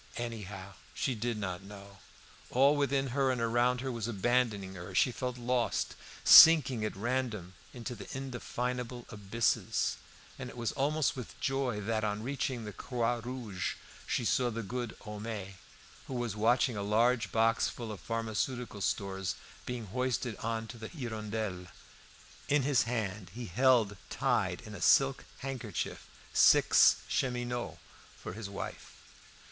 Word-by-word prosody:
Anyhow, 105 -5 -6 0.2
she 135 - 0
did 115 0 -2
not 95 -4 -3
know. 100 0 -12 0.5
All 140 +4 +5
within 140 -1 +1
her 135 +1 +1
and 130 -2 0
around 120 +2 +2
her 135 0 -2
was 115 -2 -3
abandoning 110 -3 0
her. 90 -1 -8
She 125 - +4
felt 125 0 -4
lost, 125 0 0 0.3
sinking 135 -8 +9
at 110 - -2
random 115 -5 -2 0.2
into 125 0 -6 0.2
indefinable 125 -2 -4
abysses, 105 +2 0 0.4
and 125 -2 -5
it 125 - -11
was 115 -1 -1
almost 145 +2 +1
with 125 -4 -8
joy 135 -5 -1
that, 110 +1 -1
on 105 0 -1
reaching 130 -2 -2
the 105 - -6
"Croix 120 -2 -1
Rouge," 120 -6 -4 0.3
she 120 - 0
saw 125 +3 +2
the 115 0 -4
good 120 +2 -4
Homais, 105 -2 -6 0.5
who 130 - -5
was 120 -4 -2
watching 115 +3 +3
a 100 - -3
large 110 +2 +2
box 115 0 +3
full 115 -3 -6
of 105 - -7
pharmaceutical 115 0 -3
stores 95 -2 -1 0.3
being 125 -2 -4
hoisted 125 +1 -1
on 115 0 -2
to 120 - -9
the 110 - -6
"Hirondelle." 110 - -4 0.8
In 145 -1 +3
his 140 -1 +3
hand 105 -5 -3
he 120 0 -5
held 115 0 +3
tied - - 0
in - - -10
a - - -8
silk - - +4 0.2
handkerchief 135 -2 -4 0.3
six - - +6
cheminots 120 -2 -2 0.4
for - - -7
his 105 0 -6
wife. 100 - -6
115 Hz, 145 wpm, -32 LUFS, 105-125 Hz, 0.8 s, sinking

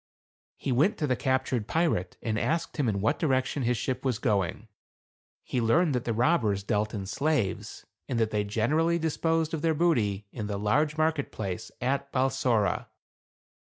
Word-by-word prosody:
He 135 - -3
went 145 - +3
to 155 - 0
the 130 -3 +1
captured 130 -4 0
pirate 155 - 0
and 110 -2 0
asked 165 +6 -1
him 140 -6 +2
in 100 -2 -1
what 110 +9 +1
direction 135 -2 +1
his 120 -1 +1
ship 130 +1 -2
was 130 -5 0
going. 105 -2 -1 0.8
He 125 - -1
learned 150 +8 +3
that 125 -1 -1
the 115 - 0
robbers 110 - +2
dealt 105 0 -1
in 100 -2 -4
slaves, 130 -1 -1 0.2
and 125 -3 0
that 110 -1 +1
they 105 -1 +1
generally 150 +12 +1
disposed 160 0 0
of 160 - -2
their 160 0 +2
booty 110 - +1
in 105 -4 -5
the 100 -1 -2
large 150 +10 +1
market 155 -2 +1
place 95 -4 -4
at 140 +2 -1
Balsora. 130 -5 +1
130 Hz, 170 wpm, -28 LUFS, 105-155 Hz, 0.8 s, went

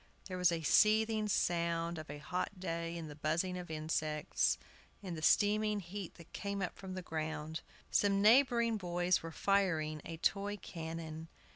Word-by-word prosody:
There 185 -2 -5
was 180 -1 +5
a 165 -1 -2
seething 215 +4 +4
sound 170 -3 0
of 155 - -9
a 145 - -5
hot 180 +5 -3
day 170 -2 -3
in 165 -2 -6
the 150 - -8
buzzing 160 +5 -1
of 180 -2 -6
insects, 155 -1 0 0.5
in 185 -3 -4
the 160 - -5
steaming 210 +4 +3
heat 190 0 -7
that 170 -1 -15
came 200 -1 -3
up 180 - -3
from 190 -1 -7
the 185 - -5
ground. 160 -1 -4 0.3
Some 200 -1 +3
neighboring 235 +1 +5
boys 175 -1 +1
were 165 - -6
firing 160 -6 +1
a 165 - -6
toy 200 +4 0
cannon. 160 -3 -6
175 Hz, 165 wpm, -35 LUFS, 160-200 Hz, 0.5 s, was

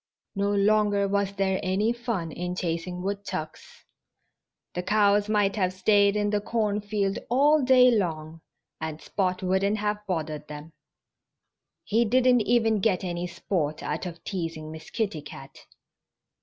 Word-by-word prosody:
No 200 0 0
longer 205 0 +2
was 200 0 0
there 195 -1 0
any 200 +4 +1
fun 230 -9 -3
in 180 +3 -4
chasing 180 0 -3
woodchucks. 195 -5 -6 0.9
The 180 - -2
cows 205 +1 +2
might 205 -2 +2
have 185 -2 +1
stayed 200 +2 +3
in 205 0 0
the 210 -1 0
cornfield 210 -2 -1
all 290 +5 +4
day 250 -1 +6
long 165 -6 -2 0.4
and 160 -1 -5
Spot 185 0 -2
wouldn't 190 +3 +1
have 210 0 -2
bothered 155 -4 -3
them. 150 +2 -9 1.1
He 225 +3 +2
didn't 250 +1 +4
even 225 -1 +2
get 190 -3 +1
any 175 -1 -3
sport 155 -4 -3
out 160 +5 -3
of 170 -1 -9
teasing 165 -5 -5
Miss 160 0 -10
Kitty 205 -9 -2
Cat. 135 -1 -12
200 Hz, 140 wpm, -26 LUFS, 175-210 Hz, 1.1 s, day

